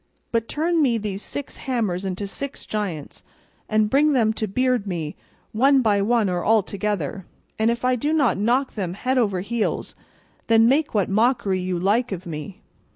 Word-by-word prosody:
But 230 Hz, -1 st, 0 dB
turn 330 Hz, +2 st, +1 dB
me 245 Hz, -5 st, +3 dB
these 205 Hz, -2 st, -4 dB
six 285 Hz, -, -6 dB
hammers 215 Hz, -8 st, -2 dB
into 190 Hz, +1 st, -3 dB
six 280 Hz, +8 st, -6 dB
giants, 190 Hz, -9 st, -4 dB, 0.5 s
and 215 Hz, -1 st, +3 dB
bring 290 Hz, +6 st, +3 dB
them 225 Hz, -4 st, +3 dB
to 215 Hz, 0 st, -2 dB
beard 250 Hz, 0 st, 0 dB
me, 165 Hz, -5 st, -3 dB, 0.4 s
one 265 Hz, +4 st, +4 dB
by 205 Hz, -3 st, +3 dB
one 225 Hz, 0 st, +2 dB
or 180 Hz, -1 st, -1 dB
all 220 Hz, -1 st, +4 dB
together, 195 Hz, -3 st, -3 dB, 0.3 s
and 220 Hz, +1 st, +3 dB
if 235 Hz, +1 st, -1 dB
I 255 Hz, 0 st, +3 dB
do 290 Hz, +5 st, -1 dB
not 295 Hz, -6 st, +3 dB
knock 245 Hz, +6 st, +1 dB
them 185 Hz, -4 st, -3 dB
head 255 Hz, +5 st, 0 dB
over 200 Hz, -6 st, +1 dB
heels, 225 Hz, +3 st, -2 dB, 0.5 s
then 225 Hz, 0 st, +5 dB
make 285 Hz, +1 st, +2 dB
what 200 Hz, -3 st, +2 dB
mockery 215 Hz, -2 st, +2 dB
you 180 Hz, -1 st, -2 dB
like 210 Hz, +7 st, +1 dB
of 185 Hz, -2 st, -5 dB
me." 170 Hz, +5 st, -7 dB
215 Hz, 180 wpm, -23 LUFS, 195-250 Hz, 0.5 s, then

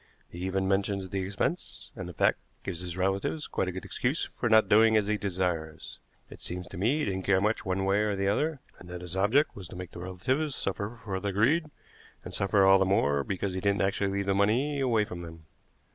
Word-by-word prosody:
He 85 Hz, -, -9 dB
even 95 Hz, 0 st, 0 dB
mentions 95 Hz, 0 st, 0 dB
the 95 Hz, +1 st, -3 dB
expense, 100 Hz, -, -3 dB
and, 95 Hz, -2 st, -6 dB
in 90 Hz, -, -10 dB
fact, -, -, +3 dB, 0.2 s
gives 85 Hz, -3 st, -4 dB
his 90 Hz, -1 st, -5 dB
relatives 95 Hz, +11 st, -1 dB
quite 95 Hz, -, -2 dB
a -, -, -1 dB
good 95 Hz, +1 st, -7 dB
excuse 130 Hz, +6 st, -1 dB
for 120 Hz, -, -3 dB
not 110 Hz, -2 st, +6 dB
doing 110 Hz, +2 st, +6 dB
as 105 Hz, -, +2 dB
he 105 Hz, +1 st, +1 dB
desires. 90 Hz, -6 st, -3 dB, 0.3 s
It -, -, -13 dB
seems 90 Hz, +1 st, -4 dB
to -, -, -8 dB
me 115 Hz, +10 st, +2 dB
he 155 Hz, -, 0 dB
didn't 95 Hz, -2 st, -2 dB
care 95 Hz, 0 st, +3 dB
much 105 Hz, 0 st, 0 dB
one 95 Hz, +1 st, 0 dB
way 100 Hz, +1 st, +3 dB
or 105 Hz, -1 st, +1 dB
the 95 Hz, 0 st, -1 dB
other, 145 Hz, +7 st, 0 dB, 0.2 s
and 90 Hz, -, -13 dB
that 90 Hz, 0 st, -6 dB
his 90 Hz, 0 st, -6 dB
object 110 Hz, +10 st, +3 dB
was 95 Hz, -3 st, -8 dB
to -, -, -11 dB
make 90 Hz, -1 st, -7 dB
the -, -, -9 dB
relatives 130 Hz, -, -1 dB
suffer 105 Hz, +4 st, -3 dB
for 95 Hz, -3 st, -3 dB
their 100 Hz, 0 st, -2 dB
greed, 150 Hz, -, +2 dB, 0.5 s
and -, -, -8 dB
suffer 100 Hz, 0 st, +3 dB
all 95 Hz, 0 st, +7 dB
the -, -, +4 dB
more 70 Hz, -7 st, +2 dB
because 95 Hz, +2 st, -3 dB
he 95 Hz, -, -3 dB
didn't 100 Hz, 0 st, +2 dB
actually 100 Hz, 0 st, 0 dB
leave 100 Hz, 0 st, -1 dB
the 100 Hz, -, +2 dB
money 120 Hz, +9 st, +2 dB
away 115 Hz, -5 st, +2 dB
from 90 Hz, -3 st, -7 dB
them. 80 Hz, -2 st, -10 dB
100 Hz, 235 wpm, -29 LUFS, 95-110 Hz, 0.5 s, all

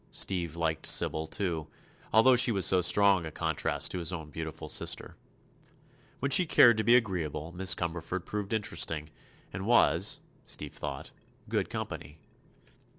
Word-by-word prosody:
Steve 85 Hz, -4 st, -2 dB
liked 80 Hz, -2 st, -1 dB
Sybil, 80 Hz, 0 st, +1 dB
too, 80 Hz, -3 st, -3 dB, 0.4 s
although 115 Hz, +4 st, +6 dB
she 120 Hz, 0 st, +4 dB
was 95 Hz, -5 st, +1 dB
so 90 Hz, +1 st, +3 dB
strong 100 Hz, 0 st, +3 dB
a 80 Hz, -, -6 dB
contrast 80 Hz, -1 st, -1 dB
to 90 Hz, -, -2 dB
his 85 Hz, 0 st, -1 dB
own 80 Hz, -4 st, -7 dB
beautiful 80 Hz, +1 st, -6 dB
sister. -, -, -3 dB, 1.0 s
When 140 Hz, +1 st, -2 dB
she 175 Hz, +6 st, +5 dB
cared 120 Hz, -6 st, +6 dB
to 110 Hz, -, 0 dB
be 120 Hz, +2 st, +5 dB
agreeable 85 Hz, -, -1 dB
Miss 95 Hz, +1 st, +1 dB
Cumberford 85 Hz, +1 st, -4 dB
proved 105 Hz, -1 st, -4 dB
interesting 85 Hz, -7 st, -1 dB, 0.4 s
and 95 Hz, +2 st, -5 dB
was, 95 Hz, -5 st, +3 dB, 0.2 s
Steve -, -, -6 dB
thought, 70 Hz, -, -6 dB, 0.4 s
"good -, -, -1 dB
company." 75 Hz, -, -6 dB
90 Hz, 150 wpm, -29 LUFS, 80-105 Hz, 1.0 s, although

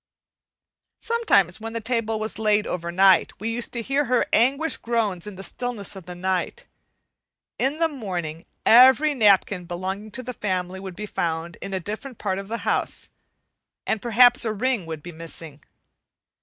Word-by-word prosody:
Sometimes, 220 Hz, -, +2 dB
when 225 Hz, 0 st, -6 dB
the 230 Hz, -, -2 dB
table 225 Hz, -1 st, -1 dB
was 220 Hz, 0 st, -4 dB
laid 210 Hz, -1 st, +2 dB
over 170 Hz, -1 st, -3 dB
night, 190 Hz, +1 st, +4 dB
we 225 Hz, +3 st, -2 dB
used 240 Hz, 0 st, -2 dB
to 235 Hz, -2 st, -3 dB
hear 275 Hz, +4 st, +1 dB
her 250 Hz, -1 st, +2 dB
anguished 275 Hz, +7 st, +2 dB
groans 215 Hz, -6 st, -1 dB
in 205 Hz, -, -7 dB
the 195 Hz, -, -7 dB
stillness 235 Hz, -3 st, -2 dB
of 185 Hz, -3 st, -11 dB
the 180 Hz, -, -7 dB
night. 185 Hz, 0 st, -2 dB, 0.9 s
In 275 Hz, +3 st, +1 dB
the 330 Hz, 0 st, +3 dB
morning 180 Hz, -, -5 dB, 0.2 s
every 265 Hz, +6 st, +7 dB
napkin 200 Hz, -6 st, +3 dB
belonging 190 Hz, +4 st, -5 dB
to 255 Hz, -, -4 dB
the 250 Hz, +1 st, -5 dB
family 185 Hz, -3 st, -3 dB
would 190 Hz, -2 st, -8 dB
be 210 Hz, -, -5 dB
found 170 Hz, -3 st, -3 dB
in 195 Hz, -, -6 dB
a 190 Hz, -, -1 dB
different 215 Hz, +7 st, -7 dB
part 195 Hz, -2 st, -2 dB
of 195 Hz, -, -8 dB
the 230 Hz, +2 st, -5 dB
house, -, -, -1 dB, 0.7 s
and 220 Hz, -, -1 dB
perhaps 245 Hz, +1 st, +5 dB
a 225 Hz, -, 0 dB
ring 230 Hz, -4 st, -1 dB
would 160 Hz, -2 st, -6 dB
be 175 Hz, -, -8 dB
missing. 160 Hz, -2 st, -8 dB
210 Hz, 170 wpm, -24 LUFS, 180-240 Hz, 0.9 s, every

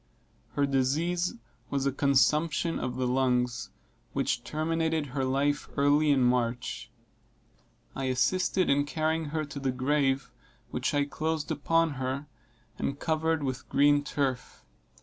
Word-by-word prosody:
Her 145 Hz, -, +2 dB
disease 155 Hz, +7 st, 0 dB, 0.3 s
was 140 Hz, -1 st, -1 dB
a 140 Hz, -, +2 dB
consumption 150 Hz, +4 st, +2 dB
of 125 Hz, 0 st, -3 dB
the 130 Hz, 0 st, -1 dB
lungs, 125 Hz, -2 st, +1 dB, 0.4 s
which -, -, 0 dB
terminated 160 Hz, 0 st, -1 dB
her 135 Hz, -1 st, 0 dB
life 140 Hz, +2 st, 0 dB
early 145 Hz, +2 st, +4 dB
in 135 Hz, -3 st, +4 dB
March. 120 Hz, -, 0 dB, 1.1 s
I 135 Hz, -, -2 dB
assisted 180 Hz, +8 st, +1 dB
in 145 Hz, +1 st, +3 dB
carrying 160 Hz, +1 st, 0 dB
her 155 Hz, +1 st, -2 dB
to 145 Hz, 0 st, -7 dB
the 135 Hz, -1 st, 0 dB
grave, 135 Hz, 0 st, 0 dB, 0.4 s
which -, -, -1 dB
I 145 Hz, 0 st, +2 dB
closed 155 Hz, +1 st, -2 dB
upon 165 Hz, +2 st, +2 dB
her, 130 Hz, +3 st, -2 dB, 0.5 s
and 140 Hz, -, -2 dB
covered 160 Hz, -1 st, 0 dB
with 130 Hz, -2 st, -4 dB
green 145 Hz, +1 st, +4 dB
turf. 135 Hz, -4 st, -3 dB
145 Hz, 130 wpm, -29 LUFS, 130-155 Hz, 1.1 s, early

